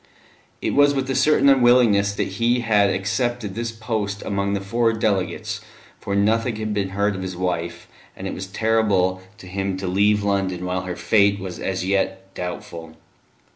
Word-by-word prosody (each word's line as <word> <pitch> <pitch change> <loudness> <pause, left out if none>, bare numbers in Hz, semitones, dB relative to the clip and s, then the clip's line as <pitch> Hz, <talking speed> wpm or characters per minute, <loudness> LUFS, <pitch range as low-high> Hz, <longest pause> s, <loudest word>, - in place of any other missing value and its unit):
It - - 0
was 145 0 +4
with 135 -1 -1
a - - -1
certain 150 +1 +4
unwillingness 120 -6 +4
that - - -1
he 120 +1 +2
had 105 -3 +3
accepted 110 +2 -1
this 115 +2 -3
post 110 -3 -3
among 100 0 -1
the 100 - 0
four 115 +4 +1
delegates, 105 -4 -1 0.4
for 100 - -3
nothing 115 +3 +2
had 110 0 -3
been 100 -2 -1
heard 100 +1 0
of 95 - -5
his 95 -1 -5
wife, 85 -2 -3 0.3
and - - -8
it - - -3
was 95 - -6
terrible 100 -3 +1 0.2
to 100 - -13
him 95 +1 -3
to 95 - -5
leave 100 +3 +2
London 95 -3 -1
while 90 0 -2
her 90 -1 -4
fate 100 -2 +3
was 95 -2 -6
as 95 -1 -2
yet 95 0 -1
doubtful. 85 -3 -7
100 Hz, 175 wpm, -22 LUFS, 95-115 Hz, 0.4 s, was